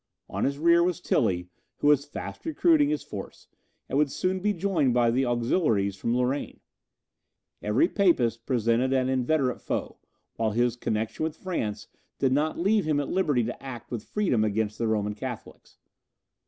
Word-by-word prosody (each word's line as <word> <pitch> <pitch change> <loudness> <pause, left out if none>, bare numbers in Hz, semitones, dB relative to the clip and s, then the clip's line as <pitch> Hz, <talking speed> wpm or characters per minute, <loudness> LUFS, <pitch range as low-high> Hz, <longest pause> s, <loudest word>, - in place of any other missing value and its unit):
On - - -2
his 140 +1 -1
rear 170 +2 +5
was 180 0 +1
Tilly, 90 - 0 0.3
who - - -4
was 145 -1 +4
fast 145 - -7
recruiting 320 -2 +3
his 310 - -1
force, - - -9 0.4
and 140 - 0
would 150 -1 +3
soon 185 +6 -1
be 210 +3 +1
joined 170 -9 +1
by 120 -1 +4
the 130 +2 +1
auxiliaries 115 - +1
from 115 +5 -1
Lorraine. 125 +3 -1 1.0
Every 105 +10 +2
Papist 125 - +1
presented 120 +1 +1
an 130 -1 +1
inveterate 130 0 0
foe, - - -4 0.4
while 110 -2 0
his 120 +1 +1
connexion 110 0 -3
with 160 -1 -2
France 110 - -3 0.3
did 135 - +1
not 150 +4 +1
leave 200 +2 +2
him 150 -2 +1
at 145 - -3
liberty 150 -10 +1
to - - -5
act 130 -4 -8
with 115 -3 -5
freedom 180 - +1
against 110 0 -1
the 115 - 0
Roman 105 -1 0
Catholics. 120 +2 -8
130 Hz, 170 wpm, -27 LUFS, 115-165 Hz, 1.0 s, rear